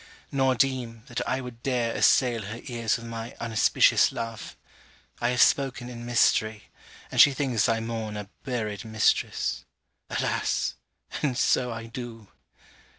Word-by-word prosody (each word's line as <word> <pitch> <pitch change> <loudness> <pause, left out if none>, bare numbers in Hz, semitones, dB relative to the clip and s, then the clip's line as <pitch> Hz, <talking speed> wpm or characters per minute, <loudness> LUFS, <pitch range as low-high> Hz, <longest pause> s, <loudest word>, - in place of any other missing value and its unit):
Nor 135 -2 +2
deem, 125 -4 -1
that 120 - -3
I 130 +1 0
would 125 -2 -9
dare 120 -3 0
assail 120 -3 +3
her 105 +3 -6
ears 115 -4 -1
with 115 - -10
my 115 0 -6
unauspicious 115 -2 +3
love. 115 -3 -6 0.6
I 120 - +1
have 125 0 +5
spoken 130 -3 +1
in 120 -1 -8
mystery; 110 -2 +2 0.4
and - - +6
she 145 - +7
thinks 125 -5 +1
I 115 0 +1
mourn 110 -2 -4
a 105 -1 -6 0.2
buried 110 -6 -3
mistress. 110 -1 0 0.5
Alas! - - -1 0.5
and 135 -5 0
so 125 0 +2
I 115 0 -6
do! 115 -2 -8
115 Hz, 145 wpm, -26 LUFS, 115-125 Hz, 0.6 s, she